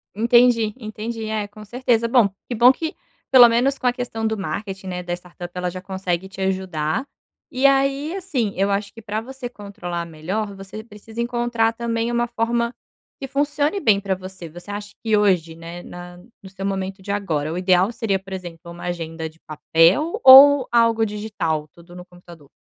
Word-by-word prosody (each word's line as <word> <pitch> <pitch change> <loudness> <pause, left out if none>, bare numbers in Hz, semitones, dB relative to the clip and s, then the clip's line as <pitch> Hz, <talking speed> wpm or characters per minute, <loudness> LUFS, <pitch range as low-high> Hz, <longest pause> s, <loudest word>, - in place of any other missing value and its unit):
Entendi, 235 -1 +4
entendi. 220 0 -6
É, 215 -1 -2
com 210 +1 -13
certeza. 240 0 0
Bom 230 -4 +4 0.2
que 245 - -2
bom 240 +3 +7
que 320 +4 -5 0.3
pelo 245 -3 +8
menos 250 +4 +2
com - - -9
a - - +5
questão 245 -3 -4
do 220 0 0
marketing, 195 +2 -5
né, 180 -1 -4
da 175 - -6
startup, 175 0 -9
ela 180 0 -2
já 185 +1 -7
consegue 190 -1 -3
te 195 - -13
ajudar. 190 - -1 0.5
E 260 +2 0
aí 275 +4 +2
assim, 275 - -2
eu 195 +1 +1
acho 200 0 -2
que 225 - -12
pra 210 0 -3
você 255 +2 -7
controlar 200 -6 -6
melhor, 190 +6 -4
você 195 +2 -9
precisa 220 +1 -8
encontrar 235 -1 0
também 230 0 -2
uma 240 0 +1
forma 235 0 -1 0.5
que 270 - -5
funcione 290 +6 0
bem 210 - +4
pra 195 -1 -1
você. 185 -1 -9
Você 175 +5 -10
acha 205 0 -6
que 220 -2 +2
hoje, 180 -6 +2
né, 170 +1 -9
na 175 0 -10 0.3
no 190 - -11
seu 195 0 -7
momento 195 0 -3
de 200 - -5
agora, 160 -7 -2
o 170 - -4
ideal 185 +2 +3
seria, 225 -4 -1
por 195 0 -15
exemplo, 175 -2 -8
uma 170 - -10
agenda 165 -2 -4
de 160 +1 -24
papel 165 - +2
ou 270 +1 +10
algo 230 -1 +3
digital? 205 -8 -3
Tudo 175 +1 -16
no 180 0 -10
computador. 175 -5 -16
205 Hz, 190 wpm, -21 LUFS, 180-235 Hz, 0.5 s, ou